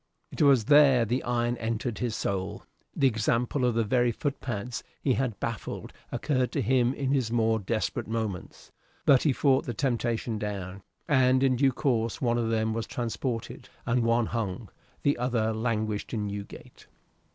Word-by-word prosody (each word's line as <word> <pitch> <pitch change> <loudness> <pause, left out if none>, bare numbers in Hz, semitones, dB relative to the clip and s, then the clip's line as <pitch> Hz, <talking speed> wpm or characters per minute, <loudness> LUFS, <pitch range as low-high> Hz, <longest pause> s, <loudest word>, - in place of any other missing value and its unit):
It - - -4
was 135 -7 +5
there 140 -4 +6
the 120 +4 0
iron 120 0 0
entered 115 +1 -3
his 120 -3 -1
soul. 95 -1 -3 0.3
The 140 - +2
example 120 +2 +1
of 120 -2 +1
the 115 - +2
very 120 +2 +2
footpads 125 -4 -4 0.2
he 135 - +1
had 125 -4 -1
baffled 115 -2 -5 0.2
occurred 130 -4 0
to 140 - 0
him 125 +2 +2
in 135 -1 -1
his 130 -5 +1
more 115 -1 +2
desperate 110 +3 -2
moments, 110 -5 -5 0.3
but 135 -3 +6
he 150 - +3
fought 135 0 +2
the 120 - -3
temptation 120 -3 -1
down: 100 -2 -5 0.3
and 130 -2 +4
in 130 -1 +3
due 135 +2 +3
course 120 -4 0
one 120 -2 +1
of 115 -1 0
them 110 -1 0
was 115 0 -3
transported, 120 0 -4 0.2
and 125 +1 +1
one 115 0 +2
hung; 110 -3 -3 0.3
the 145 -3 +2
other 115 -3 0
languished 110 -1 -2
in 105 -1 -1
Newgate. 100 0 -8
120 Hz, 165 wpm, -28 LUFS, 110-130 Hz, 0.3 s, there